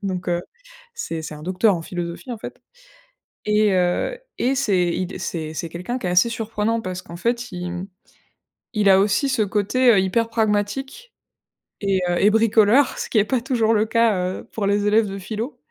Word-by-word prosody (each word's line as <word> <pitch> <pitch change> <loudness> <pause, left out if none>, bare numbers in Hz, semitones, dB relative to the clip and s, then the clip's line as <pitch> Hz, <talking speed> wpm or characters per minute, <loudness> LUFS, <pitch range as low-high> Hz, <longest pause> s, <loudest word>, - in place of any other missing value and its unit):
donc 185 -2 -3
heu, 175 0 0 0.5
c'est 165 - -4
c'est 155 -1 -7
un 150 - -11
docteur 185 +4 +2
en 170 - -4
philosophie 175 +7 -6
en 235 - -4
fait - - -9 0.9
et 210 -1 +3
heu, 185 - 0 0.2
et 260 +2 +1
c'est 200 -10 +1
il 185 - -1
d 180 - -8
c'est 160 -2 -4
c'est 170 0 -4
quelqu'un 180 +10 -4
qui 215 - -5
est - - 0
assez 180 +6 +4
surprenant. 225 0 -2
Parce 185 -2 -4
qu'en 175 -2 -10
fait 235 +5 -2
il 180 -1 -5
mmh, 180 +2 -6 0.9
il 210 -3 +3
a 190 0 +7
aussi 210 +7 +1
ce 255 -4 +1
côté, 210 +5 +2
heu, 205 - +5
hyper 225 +5 +1
pragmatique 230 - -1 0.7
et 195 -2 +1
heu, 175 - +1
et 205 - +5
bricoleur, 225 +4 +4
ce - - -4
qui - - -3
est 210 - +5
pas 245 +4 0
toujours 230 -3 +1
le 215 0 +2
cas, 230 0 +3 0.3
heu, - - -14
pour 210 -3 -2
les 205 +1 +1
élèves 215 +1 +4
de 195 0 -6
philo 220 +7 -5
210 Hz, 200 wpm, -22 LUFS, 185-230 Hz, 0.9 s, a